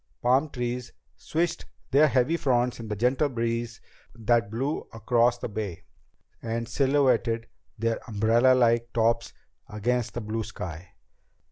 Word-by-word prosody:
Palm 130 +5 +3
trees 125 -1 -4 0.2
swished 170 +1 -2 0.3
their 145 +3 +6
heavy 135 +4 +2
fronds 125 -6 +1
in 115 - -7
the 105 - -3
gentle 125 +7 +1
breeze 115 -2 -2 0.4
that 115 -2 +1
blew 130 +7 -1
across 120 +2 +2
the - - -4
Bay 105 -5 -5 0.6
and 115 0 -3
silhouetted 125 -3 +2 0.3
their 115 +1 0
umbrellalike 115 +2 +3
tops 115 0 +1 0.4
against 120 +3 -1
the 120 - -2
blue 110 +1 -3
sky. 90 -4 -8
120 Hz, 125 wpm, -27 LUFS, 115-125 Hz, 0.6 s, their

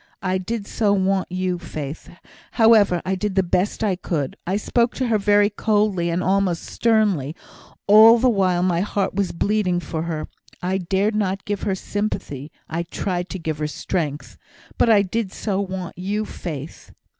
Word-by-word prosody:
I 185 0 0
did 210 +3 -4
so 205 -1 +1
want 190 -1 0
you, 185 -1 -1
Faith! 155 -3 -7 0.4
However, 215 -6 +5
I 190 - 0
did 190 +1 -2
the 190 - +3
best 185 +4 0
I 200 -4 +1
could; 155 -6 -3
I 190 +3 +1
spoke 235 +3 +1
to 260 - -1
her 220 -2 +2
very 205 +1 +3
coldly, 205 -5 +1
and 170 +2 -1
almost 190 -3 +1
sternly, 205 - +1 0.5
all 220 +3 +8
the 255 - +2
while 185 -6 +2
my 175 -2 +1
heart 200 0 -1
was 195 -1 -1
bleeding 190 -1 0
for 165 -2 -4
her. 160 -2 -3 0.3
I 185 +2 -1
dared 195 +4 0
not 195 -2 -1
give 205 -1 -3
her 190 - +1
sympathy; 170 -9 -4 0.2
I 165 +2 -2
tried 175 +1 -3
to 190 - -4
give 160 -3 -4
her 150 - -1
strength. 150 -2 -4 0.4
But - - +4
I 210 -3 +6
did 200 +1 -2
so 200 -1 -2
want 185 -2 -5
you, 205 +3 -2
Faith." 155 -7 -7
190 Hz, 175 wpm, -22 LUFS, 175-205 Hz, 0.5 s, all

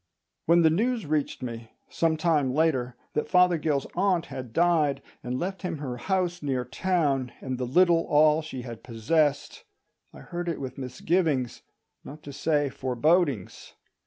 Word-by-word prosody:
When 170 +1 +5
the 160 - +5
news 230 +4 0
reached 150 -3 -1
me, 115 -2 -7
some 160 -1 0
time 150 -5 +1
later, 130 -6 +1 0.2
that 150 - -2
Fothergill's 170 -6 +3
aunt 180 -2 +1
had 125 -3 -7
died 155 -2 +2 0.2
and 125 +1 -3
left 190 +5 -4
him 180 -4 -3
her 130 -4 -5
house 180 +4 -1
near 130 -4 -1
town 140 -5 0
and 130 -1 -4
the 125 - -2
little 170 +4 +4
all 150 +1 +4
she 135 -5 -7
had 120 -3 -8
possessed, 145 - 0 0.5
I - - -13
heard 175 0 -5
it 165 - -3
with 135 0 -6
misgivings, 135 0 -1 0.4
not 150 +2 -11
to 140 - -8
say 145 +1 +1
forebodings. 135 - 0
150 Hz, 155 wpm, -27 LUFS, 130-170 Hz, 0.5 s, When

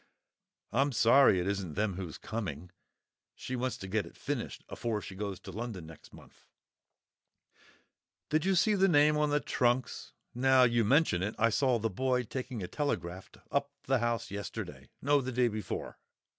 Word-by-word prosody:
I'm 135 +4 +2
sorry 115 -3 +6
it 90 - -2
isn't 95 -6 -2
them 105 -1 0
who's 90 -4 -6
coming. 90 -6 -5 0.6
She 130 - -5
wants 125 -1 -2
to 95 - -7
get 100 -2 -1
it - - -15
finished - - -4
afore 115 -3 -2
she 100 - -8
goes 100 0 -4
to 95 - -9
London 105 -4 -5
next 80 -1 -14
month." - - -17 1.8
"Did 155 +1 +2
you 190 +1 +2
see 210 +4 +4
the 195 -1 +4
name 150 -3 +5
on 150 0 +2
the 145 0 +2
trunks? 125 -2 0 0.2
Now 130 +1 +5
you 120 -1 +3
mention 130 - +3
it, 105 +3 -2
I 115 +2 +3
saw 125 +1 +2
the 115 0 -1
boy 125 +4 +1
taking 125 -2 -5
a - - -4
telegraft 90 - -3
up 140 0 0
to - - -27
the 135 -1 +4
house 120 -2 -1
yesterday—no, 140 +7 -2
the 130 0 -4
day 125 0 +2
before." 110 -1 -5
120 Hz, 170 wpm, -31 LUFS, 100-135 Hz, 1.8 s, sorry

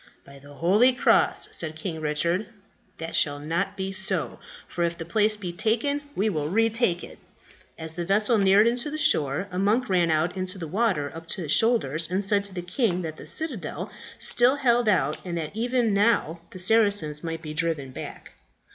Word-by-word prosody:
"By 140 0 -14
the 145 +1 -15
holy 210 - +4
cross," 245 - +2
said 160 -2 -4
King 160 0 -5
Richard, 170 +6 -1 0.5
"that 165 0 -6
shall 145 -1 +2
not 170 +7 -3
be 190 0 -3
so; 190 -3 -1 0.3
for 175 - -3
if 170 0 -1
the 165 - -6
place 215 +4 +1
be 180 -4 -6
taken, 235 +10 0
we 205 - +1
will 155 -7 -2
retake 225 -2 +1
it." - - -11 0.6
As 160 0 -7
the 175 +1 -4
vessel 210 +5 +2
neared 195 +2 +5
the 245 +6 0
shore 150 - +1
a 180 - -3
monk 220 +6 +1
ran 175 -3 +2
out 160 +3 +1
into 185 +1 0
the 165 -3 -6
water 185 -6 0
up 165 0 -10
to 185 +1 -4
his 150 - -4
shoulders, 165 - +2
and 185 +3 -1
said 200 0 +1
to 200 - -8
the 175 - -4
king 180 -1 -1
that 155 -1 -6
the - - -11
citadel 300 - -4 0.3
still 245 +3 +5
held 240 -5 +2
out, 155 -7 +1
and 175 -2 -4
that 160 +3 -5
even 240 -1 0
now 200 -6 +1
the - - -11
Saracens 185 -6 +2
might 165 0 -5
be 155 -1 -6
driven 155 -4 -2
back. - - -9
185 Hz, 190 wpm, -25 LUFS, 160-220 Hz, 0.6 s, neared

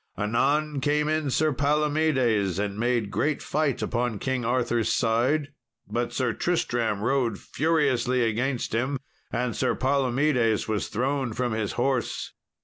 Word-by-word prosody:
Anon 140 +7 +1
came 150 +2 +1
in 155 -2 0
Sir 155 +3 +2
Palomedes, 140 - +1
and 100 0 -2
made 120 -3 0
great 150 0 0
fight 150 -4 0
upon 120 -2 -1
King 130 +2 -2
Arthur's 120 -1 +1
side. 130 +6 +1 0.4
But 120 0 -2
Sir 125 -3 0
Tristram 120 - 0
rode 120 -4 +1
furiously 130 -6 +1
against 120 +3 -1
him, 130 +5 0 0.3
and 120 -1 -1
Sir - - +1
Palomedes 130 -3 +1
was 110 -2 -1
thrown 130 +1 -1
from 125 +1 -1
his 110 -2 -2
horse. 130 0 -1
125 Hz, 135 wpm, -26 LUFS, 115-145 Hz, 0.4 s, Sir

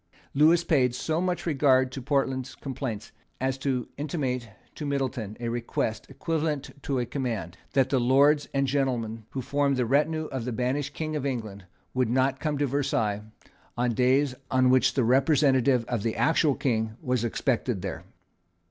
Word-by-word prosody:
Lewis 160 +4 +5
paid 130 -7 +2
so 160 +5 -1
much 180 -1 -1
regard 135 -4 +3
to 135 - -6
Portland's 135 -1 -1
complaints 130 -6 -5 0.3
as 130 0 0
to 130 -3 -1
intimate 135 -5 -2 0.2
to - - -7
Middleton 135 -7 -2
a 120 - -3
request, 115 -1 -2
equivalent 150 -4 -2
to 135 -1 -2
a 125 - 0
command, 115 - -3 0.2
that 135 -1 +2
the 135 - +3
Lords 140 +4 +4
and 140 0 +1
gentlemen 120 -5 -1
who 130 - -4
formed 140 0 +1
the 125 - +1
retinue 150 +5 +1
of 130 -3 -3
the 125 - -3
banished 130 +4 -2
King 155 -1 -3
of 150 - -2
England 110 -8 -4 0.3
would 130 -3 +1
not 130 +2 +1
come 150 -1 -1
to 145 - +1
Versailles 115 -7 0 0.6
on 120 0 +1
days 130 +3 +3 0.2
on 130 -1 +4
which 130 0 +3
the 130 - +3
representative 130 -1 +3
of 120 -2 -2
the 115 +1 -1
actual 155 -3 +3
King 110 -3 -1
was 125 -2 -1
expected 120 -3 -1
there. 95 -5 -5
130 Hz, 165 wpm, -27 LUFS, 120-145 Hz, 0.6 s, Lewis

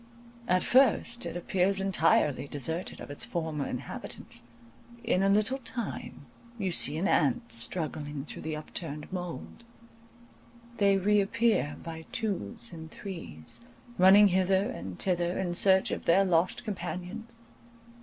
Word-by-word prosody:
At 185 -3 +3
first 245 -2 +3
it - - -4
appears 190 +2 +1
entirely 165 -7 +2
deserted 160 +6 -2
of - - -8
its 145 - -4
former 160 -4 -3
inhabitants; 125 - -6 0.6
in 230 -5 +2
a 195 - +3
little 215 +6 +2
time 240 -1 -6 0.3
you 195 -4 -1
see 150 -2 +3
an 185 +5 0
ant 245 +1 +1
struggling 145 +2 -2
through - - -8
the 155 0 -3
upturned 150 +1 -6
mould; 180 +5 -6 1.1
they 200 -1 +4
reappear 210 -2 +2
by 160 -1 -8
twos 180 - -3
and 160 -1 -9
threes, 165 - -8 0.4
running 195 +3 +8
hither 190 +1 +2
and 90 +1 -7
thither 175 -1 0
in 180 -2 -1
search 190 +1 +4
of - - -4
their 190 +4 +5
lost 175 -1 +1
companions. 205 +4 -6
185 Hz, 130 wpm, -29 LUFS, 160-200 Hz, 1.1 s, running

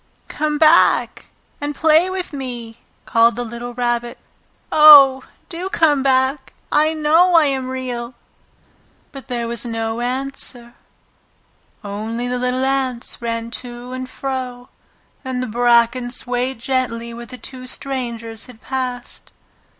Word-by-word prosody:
"Come 300 0 -2
back 315 +2 +4 0.3
and 290 0 -3
play 320 +4 +4
with 370 -3 -4
me!" 240 -4 -7 0.3
called 230 0 +3
the 245 - -3
little 240 +1 -7
Rabbit. 240 -1 -2 0.5
"Oh, 285 -4 +8 0.3
do 355 +2 -5
come 300 -6 +2
back! 265 +1 +1 0.2
I 310 +2 +2
know 325 +4 +4
I 325 -2 +6
am 265 -2 -1
Real!" 250 -2 -5 1.0
But 275 -1 -10
there 240 -2 -3
was 235 -1 -3
no 225 -1 -3
answer, 250 -1 -4 1.1
only 220 +4 -4
the 250 0 -2
little 250 +1 0
ants 260 -4 -2
ran 230 0 -3
to 245 0 -9
and 255 0 -6
fro, 255 -2 -5 0.5
and 255 -1 -3
the - - -2
bracken 240 +1 +2
swayed 250 +1 -2
gently 235 -2 -2
where 235 0 -9
the 255 - -9
two 255 0 -9
strangers 235 -4 -5
had 245 -3 -14
passed. 250 -2 -5
250 Hz, 130 wpm, -19 LUFS, 235-270 Hz, 1.1 s, Oh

